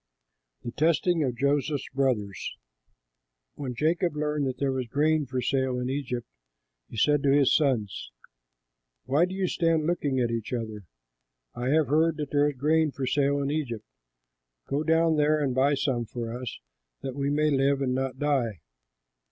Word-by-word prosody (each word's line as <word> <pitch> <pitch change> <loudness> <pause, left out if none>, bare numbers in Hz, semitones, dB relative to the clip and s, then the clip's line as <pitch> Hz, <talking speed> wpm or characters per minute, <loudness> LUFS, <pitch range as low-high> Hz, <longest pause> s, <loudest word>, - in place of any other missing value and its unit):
THE 120 - -4
TESTING 165 +3 +2
OF 125 -3 -2
JOSEPH'S 140 +1 0
BROTHERS 120 -8 -1 1.0
When 130 -4 -5
Jacob 165 +4 +1
learned 150 -1 -1
that 130 -1 -3
there 135 +1 0
was 130 -2 -2
grain 150 +3 +1
for 130 -1 -2
sale 130 0 0
in 125 +1 -2
Egypt, 125 -3 -3 0.6
he - - -9
said 145 +5 +3
to 140 - +3
his 140 -1 +4
sons, 120 - 0 1.0
"Why 150 +6 +3
do 185 +1 -6
you 190 -1 0
stand 165 -3 +1
looking 145 -6 0
at 120 -2 +1
each 115 +1 -3
other? 110 -4 -4 0.7
I 120 +1 -4
have 155 -2 +3
heard 160 +2 +3
that 150 -2 -4
there 145 0 +3
is 140 - -8
grain 155 +3 +2
for 135 -1 -4
sale 140 +1 +1
in 140 - -1
Egypt; 120 -8 -3 0.8
go 140 +2 -1
down 160 0 +3
there 150 +1 +3
and 140 -4 0
buy 135 +3 +3
some 130 -4 -1
for 115 0 -5
us, 125 -1 -6 0.5
that 135 - -3
we 140 +1 -1
may 150 +1 +2
live 140 0 +2
and 130 -2 0
not 130 0 -2
die." 130 - 0
140 Hz, 170 wpm, -27 LUFS, 125-150 Hz, 1.0 s, his